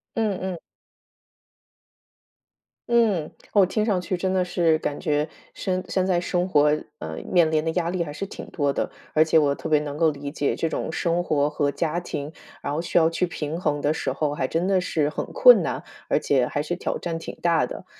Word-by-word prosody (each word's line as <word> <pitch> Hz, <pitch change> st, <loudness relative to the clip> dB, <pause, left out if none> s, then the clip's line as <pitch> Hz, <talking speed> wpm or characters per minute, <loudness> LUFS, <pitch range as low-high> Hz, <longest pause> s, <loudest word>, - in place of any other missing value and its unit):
嗯 215 Hz, -4 st, 0 dB
嗯。 185 Hz, -2 st, -4 dB, 2.3 s
嗯， 220 Hz, -9 st, +2 dB, 0.2 s
我 200 Hz, -3 st, +6 dB
听 210 Hz, +3 st, 0 dB
上 195 Hz, -5 st, +1 dB
去 180 Hz, +1 st, -2 dB
真 185 Hz, +1 st, -1 dB
的 185 Hz, -1 st, +2 dB
是 170 Hz, -3 st, +2 dB
感 145 Hz, -, -3 dB
觉 150 Hz, -2 st, 0 dB, 0.2 s
生 185 Hz, -1 st, -2 dB
现 185 Hz, 0 st, 0 dB
在 180 Hz, -2 st, +2 dB
生 180 Hz, +1 st, -1 dB
活， 150 Hz, -2 st, +4 dB, 0.3 s
呃， 80 Hz, 0 st, -6 dB, 0.2 s
面 170 Hz, -3 st, +5 dB
临 155 Hz, -1 st, +2 dB
的 160 Hz, -, 0 dB
压 170 Hz, 0 st, -1 dB
力 180 Hz, -2 st, 0 dB
还 145 Hz, -, -6 dB
是 175 Hz, +7 st, -4 dB
挺 -, -, -9 dB
多 145 Hz, -3 st, 0 dB
的， -, -, -1 dB, 0.2 s
而 155 Hz, -, +6 dB
且 160 Hz, 0 st, +3 dB
我 145 Hz, -2 st, +4 dB
特 -, -, -6 dB
别 155 Hz, -1 st, +4 dB
能 145 Hz, -1 st, -5 dB
够 160 Hz, 0 st, +4 dB
理 140 Hz, 0 st, -6 dB
解 145 Hz, -2 st, -1 dB
这 165 Hz, -, -1 dB
种 160 Hz, -, -3 dB
生 170 Hz, +1 st, 0 dB
活 145 Hz, -4 st, +1 dB
和 145 Hz, -1 st, 0 dB
家 165 Hz, +2 st, -1 dB
庭， 150 Hz, -3 st, -5 dB, 0.3 s
然 140 Hz, -, -3 dB
后 160 Hz, -, -1 dB
需 175 Hz, -, -1 dB
要 160 Hz, -1 st, +6 dB
去 175 Hz, +2 st, 0 dB
平 165 Hz, +1 st, -4 dB
衡 145 Hz, -3 st, 0 dB
的 150 Hz, +2 st, +2 dB
时 -, -, -2 dB
候 150 Hz, -2 st, -1 dB
还 130 Hz, -, -1 dB
真 170 Hz, +6 st, 0 dB
的 190 Hz, -2 st, +3 dB
是 155 Hz, -4 st, 0 dB
很 -, -, -3 dB
困 -, -, +8 dB
难， -, -, -3 dB, 0.3 s
而 -, -, +3 dB
且 130 Hz, -3 st, +2 dB
还 145 Hz, -, -2 dB
是 175 Hz, +3 st, -2 dB
挑 180 Hz, -, -3 dB
战 165 Hz, -1 st, -3 dB
挺 -, -, -8 dB
大 165 Hz, -6 st, +3 dB
的。 -, -, -8 dB
165 Hz, 235 characters per minute, -24 LUFS, 150-180 Hz, 2.3 s, 困